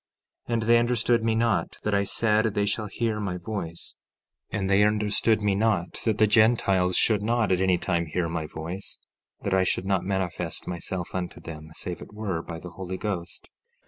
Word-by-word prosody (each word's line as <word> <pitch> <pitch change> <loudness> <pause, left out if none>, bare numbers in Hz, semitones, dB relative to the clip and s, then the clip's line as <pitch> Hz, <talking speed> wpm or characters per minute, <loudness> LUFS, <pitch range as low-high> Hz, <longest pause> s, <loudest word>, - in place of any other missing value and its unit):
15:23 120 - -2
And 115 - 0
they 115 +1 +5
understood 120 -1 +2
me 115 -1 +2
not 110 -7 +1
that 105 - 0
I 100 0 +2
said 110 +1 +1
they 100 - +2
shall 105 +1 -1
hear 110 +1 -1
my 95 -4 -2
voice; 85 -3 -6 0.6
and 100 -3 -2
they 100 +1 +4
understood 105 +1 +2
me 100 -1 +3
not 100 -4 0
that 110 -3 +2
the 110 - +5
Gentiles 105 -4 +3
should 110 -3 +3
not 115 -1 +1
at 90 0 +2
any 95 -1 +3
time 85 -1 -1
hear 85 +2 -1
my 80 -2 -3
voice—that 90 +4 -7
I 95 0 +4
should 95 - 0
not 95 -2 +1
manifest 95 -2 -2
myself 90 +1 -3
unto 90 -1 -4
them 80 -1 -9
save 90 -1 -4
it - - -11
were 100 -6 -2
by 85 -1 -7
the 90 +1 -9
Holy 95 +1 -5
Ghost. 95 -4 -4
100 Hz, 190 wpm, -26 LUFS, 90-110 Hz, 0.6 s, they